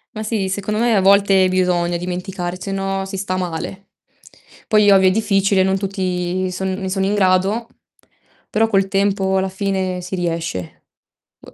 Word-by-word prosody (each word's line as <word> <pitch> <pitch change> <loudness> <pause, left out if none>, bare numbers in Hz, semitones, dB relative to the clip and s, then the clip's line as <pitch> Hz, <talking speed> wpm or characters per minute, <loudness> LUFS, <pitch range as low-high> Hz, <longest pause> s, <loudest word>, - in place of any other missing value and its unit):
Ma 215 - -4
sì, 210 -3 -2
secondo 205 +2 -2
me 235 -1 +2
a 195 - +3
volte 195 -1 +4
bisogna 180 -2 +1
dimenticare, 180 0 -4
se 195 +1 -5
no 195 0 -2
si 195 0 -6
sta 185 -1 -2
male. 180 +2 -5 0.8
Poi 210 -1 +4
ovvio 190 -1 +6
è - - +1
difficile, 195 -2 +2
non 190 0 +1
tutti 185 -2 -2
son 190 +1 -3
ne 190 0 -4
sono 190 0 0
in 200 - 0
grado, 195 +3 +1 0.8
però 225 +1 +2
col 195 -3 +2
tempo 195 0 +1
alla 190 0 0
fine 190 -1 -2
si 185 +2 -5
riesce. 165 - -4 0.6
Boh - - -16
190 Hz, 165 wpm, -19 LUFS, 185-200 Hz, 0.8 s, ovvio